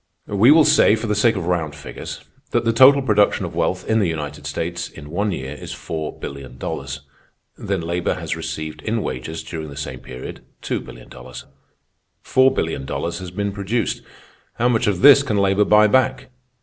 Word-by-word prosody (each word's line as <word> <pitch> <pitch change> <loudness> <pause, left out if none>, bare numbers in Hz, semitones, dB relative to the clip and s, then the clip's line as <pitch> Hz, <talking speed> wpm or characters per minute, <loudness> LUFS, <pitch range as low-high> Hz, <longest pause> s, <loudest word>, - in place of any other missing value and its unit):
We 105 +4 +3
will 155 +1 +7
say, 105 - +5
for 115 - -5
the 105 - 0
sake 110 +2 +3
of 95 -4 -3
round 85 -4 -1
figures, 75 - -8 0.3
that - - 0
the 115 - +2
total 135 +4 +7
production 105 -4 +2
of - - -7
wealth 90 0 -1
in 110 0 +2
the 100 - +2
United 75 -3 -5
States 85 +1 -4
in 75 0 -12
one 100 +4 0
year 65 -5 -5
is - - -8
four 80 -2 -5
billion 65 -2 -8
dollars. 70 0 -5 0.5
Then 95 -2 -3
labor 85 +1 -1
has - - -4
received 80 0 -6
in 110 -1 -2
wages, 80 +6 -5
during 80 -2 -6
the 70 - -10
same 65 -3 -5
period, 65 0 -9 0.2
two - - -1
billion - - -12
dollars. 65 0 -11 0.8
Four 130 0 +4
billion 80 - -2
dollars 85 +5 -4
has 90 -1 -7
been 100 +3 -3
produced. 100 +3 -2 0.5
How 120 - +1
much 115 -1 +1
of 100 -3 0
this 140 +1 +9
can 110 -7 -1
labor 100 +1 +3
buy 105 +1 +6
back? 130 +3 +1
95 Hz, 190 wpm, -21 LUFS, 75-110 Hz, 0.8 s, this